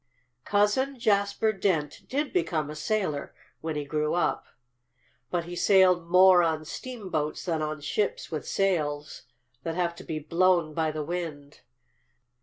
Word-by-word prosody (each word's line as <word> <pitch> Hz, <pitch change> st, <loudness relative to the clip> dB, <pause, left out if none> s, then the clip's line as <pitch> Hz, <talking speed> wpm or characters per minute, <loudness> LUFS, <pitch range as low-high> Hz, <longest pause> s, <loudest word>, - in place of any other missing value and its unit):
"Cousin 210 Hz, +7 st, +2 dB
Jasper 210 Hz, -1 st, +2 dB
Dent 170 Hz, -7 st, -1 dB
did 285 Hz, +2 st, -1 dB
become 160 Hz, -, 0 dB
a -, -, -7 dB
sailor, 185 Hz, -5 st, -2 dB, 0.2 s
when 160 Hz, -1 st, -4 dB
he 145 Hz, -1 st, -3 dB
grew 150 Hz, +2 st, -1 dB
up. 175 Hz, -, 0 dB, 0.8 s
But 175 Hz, -1 st, -1 dB
he 175 Hz, +1 st, -7 dB
sailed 180 Hz, -2 st, +4 dB
more 180 Hz, 0 st, +7 dB
on 160 Hz, -2 st, 0 dB
steamboats 185 Hz, -, -4 dB
than 165 Hz, -3 st, -1 dB
on 155 Hz, 0 st, -3 dB
ships 205 Hz, +7 st, -2 dB
with 155 Hz, -2 st, -4 dB
sails 150 Hz, -8 st, -1 dB, 0.4 s
that 165 Hz, -1 st, -4 dB
have 175 Hz, -1 st, 0 dB
to -, -, -9 dB
be 160 Hz, -, -4 dB
blown 170 Hz, +1 st, +2 dB
by 160 Hz, 0 st, 0 dB
the 155 Hz, 0 st, -3 dB
wind. 150 Hz, -3 st, -5 dB
170 Hz, 145 wpm, -27 LUFS, 155-195 Hz, 0.8 s, more